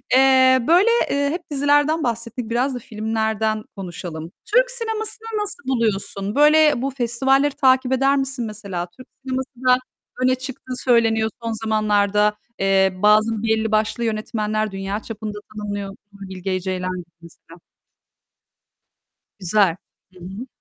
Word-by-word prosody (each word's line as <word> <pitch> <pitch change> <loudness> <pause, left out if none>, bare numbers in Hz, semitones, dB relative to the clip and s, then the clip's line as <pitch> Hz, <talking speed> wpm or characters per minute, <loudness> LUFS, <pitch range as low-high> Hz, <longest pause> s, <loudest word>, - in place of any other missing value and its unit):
Eee, 260 -1 +6
böyle, 365 +7 +5 0.2
eee, 285 0 +1
hep 340 +4 -3
dizilerden 290 +3 +2
bahsettik 235 0 -3
biraz 250 +3 0
da - - -4
filmlerden 220 -1 -2
konuşalım. 175 -3 -7
Türk - - +3
sinemasını 445 -1 -4
nasıl 405 -3 -6
buluyorsun? 210 -4 -1
Böyle 300 -2 +5
bu 275 - 0
festivalleri 265 +3 +1
takip 260 -1 +3
eder 270 +2 +3
misin 270 -3 -2
mesela? 200 -5 -5
Türk 255 - -13 0.2
sineması 260 0 -3 0.2
da 250 0 +6 0.5
öne 255 0 +4
çıktığı 260 -1 -7
söyleniyor 225 -3 +2
son 230 - -2
zamanlarda. 210 -1 +2 0.2
Eee, 195 -1 +3
bazı 215 +2 +3
belli 220 -1 +1
başlı 215 +2 0
yönetmenler 215 -1 -2
dünya 195 +2 -3
çapında 215 -2 -7 0.2
tanınıyor, 205 -1 -4 0.2
Nuri 195 -1 -10
Bilge 185 0 -3
Ceylan 185 0 -3
gibi 175 - -8 0.2
mesela. 170 0 -16 1.8
Güzel. 185 -2 +2 0.4
Hı 180 - -16
hı. 195 +8 -8
225 Hz, 130 wpm, -21 LUFS, 205-265 Hz, 1.8 s, Eee